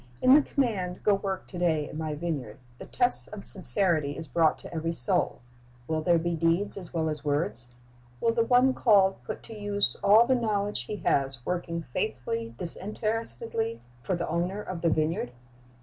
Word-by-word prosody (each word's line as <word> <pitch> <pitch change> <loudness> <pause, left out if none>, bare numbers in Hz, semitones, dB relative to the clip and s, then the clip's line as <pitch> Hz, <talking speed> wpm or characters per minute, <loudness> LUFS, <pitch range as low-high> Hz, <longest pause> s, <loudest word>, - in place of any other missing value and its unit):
In 255 - +5
the 295 - +8
command, 205 -11 -2
"Go 210 - +4
work 195 -1 -3
to 180 - -8
day 160 -4 +1
in - - -10
My 155 -1 -3
vineyard," 145 -9 -4 0.2
the - - -9
test 245 0 +3
of 210 -2 -8
sincerity 170 -6 +4
is 160 - -6
brought 165 -1 +2
to - - -10
every 165 0 -2
soul. 125 -6 0 0.5
Will 160 0 -1
there 170 +2 +3
be 170 +1 -1
deeds 165 +5 +1
as 185 -4 -8
well 160 -2 -1
as 150 -2 -4
words? 145 -5 -2 0.5
Will 230 - +1
the 230 0 +2
one 250 +2 +4
called 195 - +3
put - - -7
to 225 - -10
use 205 -1 0
all 210 +4 +6
the 260 - +2
knowledge 205 - -1
he 210 - -5
has, 135 -3 0
working 170 -2 -3
faithfully, 115 -1 -3
disinterestedly, 225 +4 -3 0.2
for 185 - -2
the 170 - -3
Owner 175 +5 -2
of 180 -3 -6
the 165 - +2
vineyard? 155 -5 -1
175 Hz, 180 wpm, -27 LUFS, 155-210 Hz, 0.5 s, the